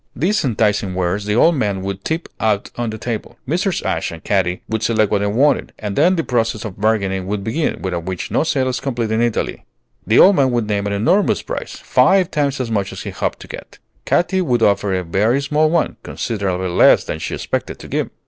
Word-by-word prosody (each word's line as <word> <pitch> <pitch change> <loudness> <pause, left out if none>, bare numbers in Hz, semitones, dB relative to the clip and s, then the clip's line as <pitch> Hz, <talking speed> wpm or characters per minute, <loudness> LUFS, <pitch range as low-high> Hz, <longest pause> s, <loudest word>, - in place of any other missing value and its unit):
These 185 - +1
enticing 105 -6 0
wares 95 +3 -1
the 105 0 0
old 165 +8 +5
man 105 - -1
would 100 0 -5
tip 160 +2 -2
out 105 -2 0
on 120 -1 -2
the 110 - -5
table. 110 0 -5
Mrs. 180 - -1
Ashe - - -1
and 80 0 -10
Katy 90 -3 0
would 110 -1 -2
select 110 -2 +1
what 105 - +2
they 100 - 0
wanted, 135 +8 +1
and 105 -2 -4
then 175 - +4
the 165 - 0
process 115 -3 -1
of 100 -2 -8
bargaining 100 -4 0
would 100 0 -2
begin, 150 +10 -2
without 90 -3 -3
which 95 -1 -4
no - - +2
sale 135 -5 0
is 125 -2 -2
complete 120 -4 -2
in 110 +1 +1
Italy. 120 -2 -1 0.4
The 110 - +3
old 195 0 +7
man 135 -2 +4
would 120 -3 0
name 100 -1 -1
an 100 - -2
enormous 115 - +2
price, - - -5
five 190 -2 +3
times 140 -2 0
as 120 -3 -3
much 100 -3 -1
as - - -7
he - - -5
hoped - - -3
to - - -10
get. - - -10 0.3
Katy 190 +2 +2
would 125 -9 +1
offer 100 0 +2
a 95 -1 0
very 105 +9 +1
small 150 +2 +1
one, 170 0 0
considerably 95 -5 -3
less 85 - +5
than 80 - -5
she - - -4
expected - - -3
to - - -11
give. - - -2
110 Hz, 225 wpm, -19 LUFS, 100-140 Hz, 0.4 s, old